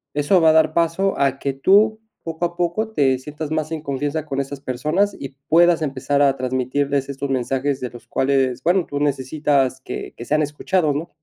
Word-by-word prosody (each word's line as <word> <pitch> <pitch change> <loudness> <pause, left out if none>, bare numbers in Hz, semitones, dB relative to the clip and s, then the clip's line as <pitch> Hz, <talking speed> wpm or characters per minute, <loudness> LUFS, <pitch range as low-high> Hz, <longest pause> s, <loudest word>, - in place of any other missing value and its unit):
eso 145 +6 +3
va 160 - +6
a - - +5
dar 160 0 +4
paso 170 +4 +1
a 135 -1 +1
que 140 - -2
tú, 205 +10 +3 0.2
poco 165 +1 -3
a 170 0 -4
poco, 175 +6 -1
te 135 -7 +2
sientas 150 +3 -7
más 155 0 -2
en 160 -2 -3
confianza 145 +2 -2
con 140 -2 -3
esas 140 0 -7
personas 155 +11 0
y 135 - -6 0.2
puedas 170 +1 +5
empezar 140 -1 -1
a 140 -1 +4
transmitirles 130 +2 -1
estos 140 0 -4
mensajes 135 +2 -1
de 125 - -3
los 120 - -13
cuales, 135 -2 0
bueno, 180 +1 +2
tú 145 - -4
necesitas 140 -1 0
que - - -7
que 120 - -8
sean 155 +3 +1
escuchados, 150 +2 0
¿no? 160 +4 -4
145 Hz, 200 wpm, -21 LUFS, 135-165 Hz, 0.2 s, va